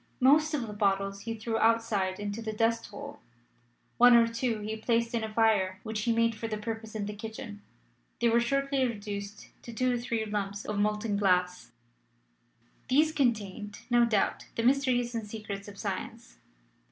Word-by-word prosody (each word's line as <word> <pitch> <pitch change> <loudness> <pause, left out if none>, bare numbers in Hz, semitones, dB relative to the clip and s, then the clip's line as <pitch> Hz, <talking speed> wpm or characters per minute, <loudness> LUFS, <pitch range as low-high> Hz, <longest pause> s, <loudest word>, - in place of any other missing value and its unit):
Most 300 +4 +4
of 260 -5 -2
the 210 - -7
bottles 195 -1 0
he 230 +2 -4
threw 225 0 -2
outside 220 -5 +1
into 205 +2 -4
the 220 -1 -3
dust 230 +1 +1
hole; 205 - -9 0.8
one 245 0 +8
or 230 -1 +6
two 230 -1 -2
he 215 +1 -3
placed 230 +1 0
in 230 -1 0
a 220 - -4
fire 210 -4 +2
which 220 -1 -3
he 235 - +1
made 230 0 +2
for 225 +1 -5
the 215 -1 -3
purpose 220 +1 -6
in 210 -2 -2
the 210 - -4
kitchen: 220 0 -8 0.6
they 235 - +3
were 230 +1 +4
shortly 275 +2 +1
reduced 205 -3 -5
to 235 - -9
two 250 +2 +1
or 245 - -1
three 235 -2 -2
lumps 205 -1 -3
of 210 -1 -2
molten 210 0 0
glass. 180 -2 +1 1.2
These 305 +4 +4
contained, 210 -7 -1
no 240 0 +5
doubt, 220 -4 +1
the 230 - -1
mysteries 250 -2 +2
and 225 -2 -4
secrets 205 -2 -6
of 200 -1 -10
Science. - - -5
220 Hz, 175 wpm, -29 LUFS, 205-235 Hz, 1.2 s, one